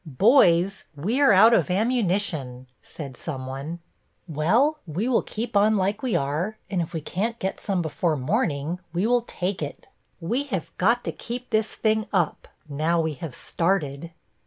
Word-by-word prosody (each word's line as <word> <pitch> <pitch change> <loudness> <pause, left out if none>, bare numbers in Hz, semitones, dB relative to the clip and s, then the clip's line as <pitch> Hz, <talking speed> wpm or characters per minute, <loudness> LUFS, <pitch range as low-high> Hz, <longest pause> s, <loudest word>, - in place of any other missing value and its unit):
"Boys, 185 - +4
we 210 - -1
are 275 - +6
out 215 +4 +7
of - - +3
ammunition," 185 - 0 0.2
said 140 -5 -9
someone. 135 +3 -5 0.5
"Well, 220 - +2
we 175 +9 -2
will 255 - +3
keep 230 +1 -5
on 210 +1 +4
like 200 +3 0
we 255 -4 0
are, 155 +10 -1
and 185 -3 +1
if 165 - -4
we 160 - -4
can't 215 +9 -2
get 190 -3 -3
some 190 -4 -1
before 160 0 0
morning, 155 - -1
we 180 +4 0
will 245 +1 +3
take 185 -5 -3
it. 145 - -6 0.3
We 235 +12 -1
have 195 - -4
got 235 +6 +2
to - - -2
keep 245 +1 -7
this 220 -1 0
thing 220 -1 +1
up, 180 -6 0 0.2
now 155 +4 0
we 160 -1 0
have 145 -1 -7
started." 165 -4 -1
185 Hz, 165 wpm, -25 LUFS, 155-220 Hz, 0.5 s, out